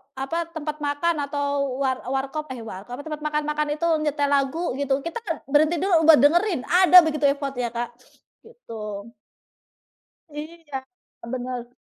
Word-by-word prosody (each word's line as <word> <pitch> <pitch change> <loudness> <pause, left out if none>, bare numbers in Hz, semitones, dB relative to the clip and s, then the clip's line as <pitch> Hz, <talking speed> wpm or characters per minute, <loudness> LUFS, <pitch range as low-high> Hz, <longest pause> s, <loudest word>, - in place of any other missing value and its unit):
apa 325 +6 -3
tempat 305 -1 -4
makan 295 +4 0
atau 280 -2 -1
war 260 -1 +1
eee, - - -7
warkop 275 +3 -3
eh 235 - -8
warkop, 220 +4 -8
tempat 305 -1 -5
makan-makan 300 0 -1
itu 335 +2 -1 0.2
nyetel 285 -1 0
lagu 285 +5 +1
gitu, 280 -1 0
kita 335 +7 -4
kan 330 - -1 0.2
berhenti 310 +3 +4
dulu 335 -5 +3
buat 315 -2 +9
dengerin, 345 +1 +3
ada 365 0 +6
begitu 305 -2 0
effort 280 -1 -4
ya 240 - 0
Kak, 240 0 -2 0.6
gitu 215 - -8 1.2
Iya, 295 -3 -7 0.5
bener. 250 -1 -4
290 Hz, 145 wpm, -24 LUFS, 265-320 Hz, 1.2 s, buat